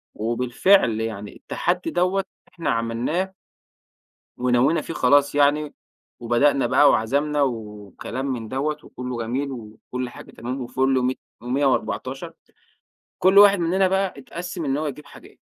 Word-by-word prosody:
وبالفعل 120 Hz, -, +2 dB
يعني 105 Hz, -2 st, -5 dB
التحدي 180 Hz, +1 st, -2 dB
دوّة 185 Hz, +2 st, +1 dB, 0.3 s
إحنا 165 Hz, -3 st, -3 dB
عملناه. 120 Hz, +12 st, -1 dB, 1.0 s
ونوّينا 125 Hz, +5 st, +2 dB
فيه -, -, -6 dB
خلاص 145 Hz, +2 st, +3 dB
يعني، 145 Hz, +1 st, +2 dB, 0.5 s
وبدأنا 120 Hz, +3 st, +2 dB
بقى 130 Hz, +4 st, +5 dB
وعزمنا 145 Hz, +6 st, +1 dB
وكلام 110 Hz, 0 st, -4 dB
من 125 Hz, -5 st, -3 dB
دوّة، 140 Hz, +5 st, -2 dB
وكلّه 125 Hz, -1 st, -6 dB
جميل 135 Hz, +5 st, -2 dB
وكل 120 Hz, +1 st, -6 dB
حاجة -, -, -12 dB
تمام 125 Hz, +3 st, -5 dB
وفُل 130 Hz, +1 st, +1 dB
مي 130 Hz, +1 st, 0 dB, 0.2 s
مِيّة 130 Hz, +4 st, 0 dB
وأربعتاشر، 135 Hz, -, -1 dB, 0.9 s
كل 190 Hz, +2 st, +5 dB
واحد 200 Hz, -1 st, +8 dB
مننا 185 Hz, +3 st, +2 dB
بقى 190 Hz, 0 st, 0 dB
أتقسِّم 170 Hz, +5 st, -6 dB
إن 135 Hz, -1 st, 0 dB
هو 155 Hz, -, -2 dB
يجيب 150 Hz, +1 st, -6 dB
حاجات. -, -, -16 dB
135 Hz, 130 wpm, -23 LUFS, 120-155 Hz, 1.0 s, واحد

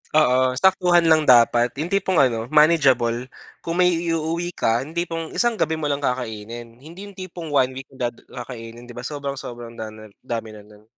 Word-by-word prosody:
Oo, 130 Hz, -4 st, +3 dB
saktuhan 180 Hz, -1 st, +4 dB
lang 155 Hz, -1 st, +5 dB
dapat. 120 Hz, 0 st, +5 dB
Yung 155 Hz, +4 st, -2 dB
tipong 190 Hz, -2 st, +1 dB
ano, 120 Hz, -3 st, +2 dB
manageable. 130 Hz, -6 st, +3 dB, 0.3 s
Kung 165 Hz, +1 st, -3 dB
may 180 Hz, 0 st, +5 dB
iuuwi 165 Hz, 0 st, -1 dB
ka, 115 Hz, +1 st, +1 dB
yung 155 Hz, +5 st, -9 dB
tipong 165 Hz, -2 st, -3 dB
isang 240 Hz, -1 st, +2 dB
gabi 160 Hz, -6 st, 0 dB
mo 155 Hz, -, -4 dB
lang 145 Hz, -1 st, -1 dB
kakainin. 120 Hz, -2 st, -4 dB
Hindi 170 Hz, +7 st, -10 dB
yung 200 Hz, -, -12 dB
tipong 180 Hz, -3 st, -8 dB
1 130 Hz, -2 st, +3 dB
week 135 Hz, +1 st, -8 dB
da 125 Hz, -2 st, -2 dB
kakainin, 120 Hz, 0 st, -10 dB
di 120 Hz, -, -10 dB
ba? 120 Hz, -, -6 dB
Sobrang, 140 Hz, -1 st, -4 dB
sobrang 120 Hz, -2 st, -8 dB
dam 110 Hz, -1 st, -8 dB, 0.2 s
dami 115 Hz, -3 st, -4 dB
na 105 Hz, -, -14 dB
nun. 105 Hz, 0 st, -18 dB
135 Hz, 185 wpm, -22 LUFS, 120-165 Hz, 0.3 s, lang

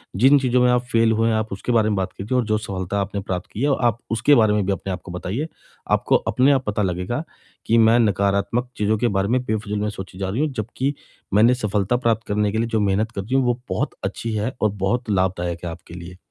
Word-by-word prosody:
जिन 135 Hz, +8 st, +5 dB
चीज़ों 125 Hz, -1 st, +2 dB
में 125 Hz, -, +4 dB
आप 125 Hz, 0 st, +2 dB
फेल 115 Hz, 0 st, +4 dB
हुए 110 Hz, +1 st, +2 dB
हैं, 110 Hz, -, +2 dB
आप 110 Hz, 0 st, -2 dB
उसके 100 Hz, +5 st, -3 dB
बारे 110 Hz, -2 st, +3 dB
में 105 Hz, -, 0 dB
बात 95 Hz, -1 st, -2 dB
कीजिए 110 Hz, +7 st, -1 dB
और 125 Hz, -, +1 dB
जो 110 Hz, 0 st, +1 dB
सफलता 100 Hz, -2 st, -3 dB
आपने 100 Hz, +1 st, -3 dB
प्राप्त 95 Hz, 0 st, -4 dB
की 110 Hz, -, -6 dB
है, 145 Hz, -, +2 dB
आप 120 Hz, -2 st, +2 dB
उसके 115 Hz, +6 st, +4 dB
बारे 110 Hz, -2 st, +4 dB
में 105 Hz, -2 st, +1 dB
भी 100 Hz, -, 0 dB
अपने 95 Hz, 0 st, -3 dB
आप 90 Hz, -, -6 dB
को 90 Hz, -, -8 dB
बताइए। 95 Hz, -, -3 dB, 0.4 s
आपको -, -, +3 dB
अपने 130 Hz, +3 st, +2 dB
आप 135 Hz, -2 st, +1 dB
पता 105 Hz, 0 st, -1 dB
लगेगा 90 Hz, -, -2 dB, 0.4 s
कि 115 Hz, -, +3 dB
मैं 115 Hz, +1 st, +5 dB
नकारात्मक 100 Hz, +3 st, +1 dB
चीज़ों 105 Hz, +1 st, +1 dB
के 120 Hz, -, +1 dB
बारे 95 Hz, +1 st, +1 dB
में 125 Hz, +2 st, +1 dB
बेफिजूल 105 Hz, -3 st, -2 dB
में 105 Hz, +1 st, -1 dB
सोची 95 Hz, -3 st, -8 dB
जा 95 Hz, -1 st, -2 dB
रही 115 Hz, +9 st, -1 dB
हूँ। 155 Hz, -, +1 dB
जबकि 130 Hz, +4 st, -2 dB, 0.4 s
मैंने 110 Hz, +5 st, +5 dB
सफलता 105 Hz, -1 st, 0 dB
प्राप्त 115 Hz, -2 st, 0 dB
करने 105 Hz, 0 st, +1 dB
के 110 Hz, -, -2 dB
लिए 115 Hz, +1 st, 0 dB
जो 110 Hz, -1 st, 0 dB
मेहनत 105 Hz, +2 st, +1 dB
कर 100 Hz, -, -4 dB
रही 120 Hz, +8 st, -3 dB
हूँ, 135 Hz, -, +4 dB
वो 120 Hz, 0 st, +1 dB
बहुत 95 Hz, -, -2 dB
अच्छी 115 Hz, -1 st, -3 dB
है 110 Hz, +5 st, -1 dB
और 110 Hz, -, +3 dB
बहुत 105 Hz, +5 st, -2 dB
लाभदायक 90 Hz, -3 st, -1 dB
है 85 Hz, -, -3 dB
आपके 80 Hz, -, -12 dB
लिए। 90 Hz, +1 st, -9 dB
110 Hz, 255 wpm, -22 LUFS, 100-120 Hz, 0.4 s, जिन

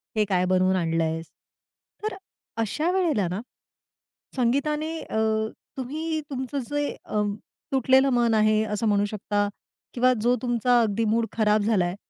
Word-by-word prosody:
"हे 215 Hz, -1 st, +3 dB
काय 185 Hz, -1 st, +2 dB
बनवून 185 Hz, +1 st, +3 dB
आणलयस?" 165 Hz, -2 st, 0 dB, 0.8 s
तर 430 Hz, -2 st, -2 dB, 0.5 s
अशा 310 Hz, -, -1 dB
वेळेला 320 Hz, -, +1 dB
ना 185 Hz, +5 st, -3 dB, 1.0 s
संगीताने 295 Hz, +6 st, +1 dB
अ, -, -, -5 dB, 0.6 s
तुम्ही 310 Hz, +5 st, -3 dB
तुमचं 265 Hz, 0 st, -3 dB
जे 290 Hz, 0 st, 0 dB, 0.2 s
अ, 210 Hz, -, -1 dB, 0.5 s
तुटलेलं 265 Hz, +1 st, +4 dB
मन 235 Hz, -1 st, +3 dB
आहे 215 Hz, 0 st, +3 dB
असं 215 Hz, +1 st, -1 dB
म्हणू 205 Hz, 0 st, +3 dB
शकता 205 Hz, -1 st, -1 dB, 0.5 s
किंवा 255 Hz, +1 st, +4 dB
जो 245 Hz, +2 st, +3 dB
तुमचा 240 Hz, 0 st, +2 dB
अगदी 225 Hz, +1 st, 0 dB
मूड 225 Hz, +2 st, +2 dB
खराब 215 Hz, -1 st, +2 dB
झाला 205 Hz, -4 st, +2 dB
आहे, 175 Hz, +2 st, -3 dB
225 Hz, 140 wpm, -25 LUFS, 205-265 Hz, 1.0 s, तुटलेलं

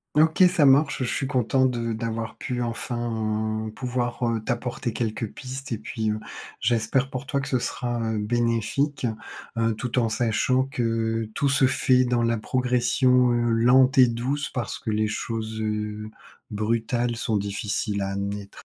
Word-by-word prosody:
OK, 160 Hz, +4 st, +5 dB
ça 150 Hz, -, +4 dB
marche, 140 Hz, 0 st, +4 dB
je -, -, -1 dB
suis -, -, -1 dB
content 130 Hz, -1 st, +2 dB
de 120 Hz, -2 st, -1 dB
d'avoir 115 Hz, 0 st, -4 dB
pu 125 Hz, -1 st, -3 dB
enfin, 110 Hz, -2 st, -2 dB
heu, -, -, -6 dB
pouvoir, 125 Hz, +1 st, -3 dB
heu, 115 Hz, -1 st, 0 dB
t'apporter 120 Hz, 0 st, -2 dB
quelques 110 Hz, -1 st, -3 dB
pistes 135 Hz, +2 st, -7 dB
et 115 Hz, -, -1 dB
puis, 110 Hz, 0 st, -3 dB
heu, 105 Hz, -, -2 dB, 0.4 s
j'espère 120 Hz, +3 st, +1 dB
pour 130 Hz, 0 st, -5 dB
toi 140 Hz, +2 st, -1 dB
que 135 Hz, -, -4 dB
ce 130 Hz, -2 st, +1 dB
sera, 120 Hz, 0 st, -2 dB
heu, 110 Hz, -, -1 dB
bénéfique. 120 Hz, +5 st, 0 dB, 0.5 s
Heu, 115 Hz, -1 st, +2 dB
tout 125 Hz, +3 st, -2 dB
en 115 Hz, -2 st, +1 dB
sachant 120 Hz, +3 st, +1 dB
que 115 Hz, -3 st, -1 dB
tout 140 Hz, -, +1 dB
se 135 Hz, 0 st, +4 dB
fait 130 Hz, -1 st, +3 dB
dans 120 Hz, -1 st, +1 dB
la 115 Hz, -1 st, +1 dB
progression, 125 Hz, +1 st, +2 dB
heu, 120 Hz, 0 st, +1 dB
lente 125 Hz, +3 st, +4 dB
et 125 Hz, -, +8 dB
douce 130 Hz, +5 st, -2 dB
parce 120 Hz, -5 st, -3 dB
que 110 Hz, -, -3 dB
les 110 Hz, 0 st, +1 dB
choses, 110 Hz, 0 st, -4 dB
heu, 105 Hz, 0 st, -3 dB, 0.4 s
brutales 115 Hz, +3 st, -1 dB
sont 115 Hz, -2 st, 0 dB
difficiles 100 Hz, 0 st, -2 dB
à 95 Hz, -, -1 dB
amener. 100 Hz, 0 st, -4 dB
120 Hz, 165 wpm, -25 LUFS, 110-125 Hz, 0.5 s, et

